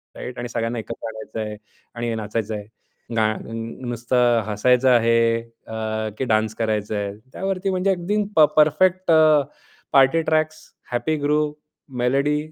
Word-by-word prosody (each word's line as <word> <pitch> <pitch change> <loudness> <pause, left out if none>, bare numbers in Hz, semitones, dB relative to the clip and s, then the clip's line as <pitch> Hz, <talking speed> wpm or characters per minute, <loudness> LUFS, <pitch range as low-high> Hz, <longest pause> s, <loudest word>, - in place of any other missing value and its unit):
Right. 125 0 -7
आणि 120 0 -4
सगळ्यांना 115 0 -2
एकत्र 110 - -6
आणायचं 110 0 -7
आहे 105 -1 -4 0.4
आणि 120 0 -3
हे 115 - -1
नाचायचं 110 0 -3
आहे. 105 -1 -6 0.5
गाण 110 -1 0 0.4
नुसतं 120 0 +2
हसायचं 125 +5 +3
आहे, 115 -1 +3 0.3
अ, 110 -1 -3
की - - -2
डान्स 110 -2 +1
करायचा 110 -2 -1
आहे. 100 -1 -2 0.2
त्यावरती 195 0 -2
म्हणजे 185 +1 0
अगदी 195 +4 0
प - - +3 0.2
परफेक्ट 175 +4 +3
अ, 155 -2 +6 0.5
party 135 +4 +5
tracks, 155 0 0 0.3
happy 155 +6 0
group, 150 +1 +1 0.4
melody, 140 +4 +2
120 Hz, 145 wpm, -22 LUFS, 110-155 Hz, 0.5 s, अ